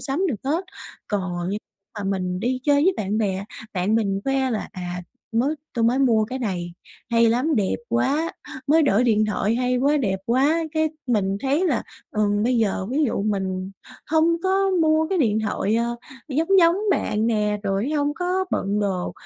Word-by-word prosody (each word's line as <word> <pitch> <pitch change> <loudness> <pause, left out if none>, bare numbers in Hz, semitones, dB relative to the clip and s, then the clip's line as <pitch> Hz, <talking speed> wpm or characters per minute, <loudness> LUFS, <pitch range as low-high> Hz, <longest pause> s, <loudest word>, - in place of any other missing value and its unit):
sắm 295 +8 -1
được 265 - 0
hết. 320 +7 0 0.4
Còn 180 -3 -2
như 205 - -2 0.4
mà 200 - -4
mình 185 -1 -2
đi 255 +3 -1
chơi 285 0 +3
với 375 - +4
bạn 210 +2 -1
bè, 195 -2 -1 0.3
bạn 185 +4 +1
mình 200 -3 +1
khoe 270 -1 +1
là: 220 -3 -3
"À, 180 -1 -5 0.3
mới 255 +7 +1 0.2
tôi 230 -1 +1
mới 245 +3 +3
mua 230 -5 +3
cái 255 +4 -5
này 180 -7 -3 0.4
hay 230 0 +4
lắm, 260 +7 +1
đẹp 195 -3 +1
quá!" 270 +8 +1 0.3
"Mới 320 +3 +5
đổi 250 -4 +3
điện 215 -2 +3
thoại 210 +1 0
hay 250 +1 +1
quá, 280 +4 +2
đẹp 195 -9 0
quá!" 285 +7 +2
Cái 315 0 +2 0.2
mình 200 -5 +1
thấy 285 +7 +1
là, 255 -8 +1 0.3
ừm, 205 -1 +1
bây 245 +1 +2
giờ 200 -3 0
ví 295 +3 +2
dụ 220 -5 -1
mình 190 -2 -2 0.4
hông 325 +1 +3
có 385 +1 +2
mua 315 0 +3
cái 380 -2 0
điện 220 -7 +2
thoại, 210 0 -1
ờ, 235 +1 -1 0.3
giống 315 +5 0
giống 335 0 +5
bạn 215 - +1
nè, 210 -2 +1
rồi 200 +7 -1
hông 290 -1 0
có 365 +2 0
bận 200 +2 0
đồ, 190 -3 -1
235 Hz, 190 wpm, -23 LUFS, 205-290 Hz, 0.4 s, Mới